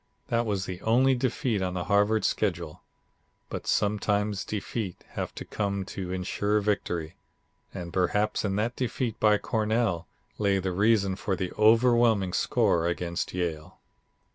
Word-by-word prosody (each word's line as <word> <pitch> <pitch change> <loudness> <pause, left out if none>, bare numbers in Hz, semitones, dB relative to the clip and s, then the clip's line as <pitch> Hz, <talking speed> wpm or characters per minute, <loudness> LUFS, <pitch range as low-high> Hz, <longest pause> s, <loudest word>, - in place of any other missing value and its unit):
That 115 0 +1
was 100 -3 -1
the 90 0 -6
only 130 +4 +4
defeat 125 -3 0
on 90 -1 -2
the 90 - -2
Harvard 105 +2 +2
schedule. 85 -6 -1 0.7
But - - -6
sometimes 105 -1 +1
defeats 105 -2 -4
have - - -5
to - - -7
come 100 -2 -2
to 90 -2 -4
insure 100 +3 0
victory, 90 -6 -2 0.5
and 85 -1 -7
perhaps 105 +4 +1
in 100 -2 -1
that 115 +4 -1
defeat 125 -2 -2
by 105 -1 +5
Cornell 110 -6 0 0.3
lay 100 -2 +2
the 95 -1 -1
reason 100 0 +2
for 95 0 -2
the 90 0 -3
overwhelming 115 -3 +4
score 85 0 +2
against 85 0 -3
Yale. 80 -4 -3
100 Hz, 140 wpm, -27 LUFS, 90-110 Hz, 0.7 s, by